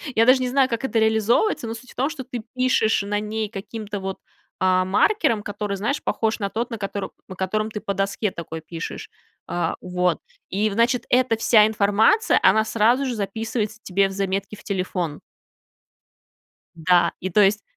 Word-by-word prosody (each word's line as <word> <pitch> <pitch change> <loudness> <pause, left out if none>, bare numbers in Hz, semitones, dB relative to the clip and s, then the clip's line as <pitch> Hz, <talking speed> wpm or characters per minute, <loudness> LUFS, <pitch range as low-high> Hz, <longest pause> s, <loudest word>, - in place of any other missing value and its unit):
я 225 - +5
даже 255 +1 +5
не 250 - 0
знаю, 265 0 +3
как 230 0 -3
это 240 -4 +1
реализовывается, 220 - +2
но 225 - -3
суть 250 +3 -12
в - - -18
том, 270 +3 0
что 315 -4 -6
ты 245 -2 -6
пишешь 255 -5 +2
на 205 +1 -1
ней 215 0 -3
каким-то 210 0 -6
вот, 190 0 -4 0.4
а, 185 0 +3
маркером, 230 - +2
который, 205 0 -3
знаешь, 235 +9 -2
похож 220 0 0
на 200 -2 -1
тот, 230 +4 -3
на 230 - -3
котор 200 -1 -4 0.2
на 190 - -8
котором 215 +4 -1
ты 210 - -4
по 200 - -2
доске 195 +1 -1
такой 160 -2 -7
пишешь. 165 +1 -7 0.4
А, 175 - -1
вот. 180 0 0 0.3
И, 210 +3 +1
значит, 235 +4 +1
эта 250 -2 +3
вся 220 -1 +5
информация, 215 - +3
она 215 +3 +5
сразу 235 +5 +2
же 255 - -1
записывается 220 +1 -3
тебе 195 +1 +2
в - - -7
заметки 195 +1 -2
в - - -16
телефон. 180 -5 -3 1.6
Да. 170 +1 +3
И 185 - -3
то 195 - +3
есть 205 +1 +4
210 Hz, 180 wpm, -23 LUFS, 195-230 Hz, 1.6 s, я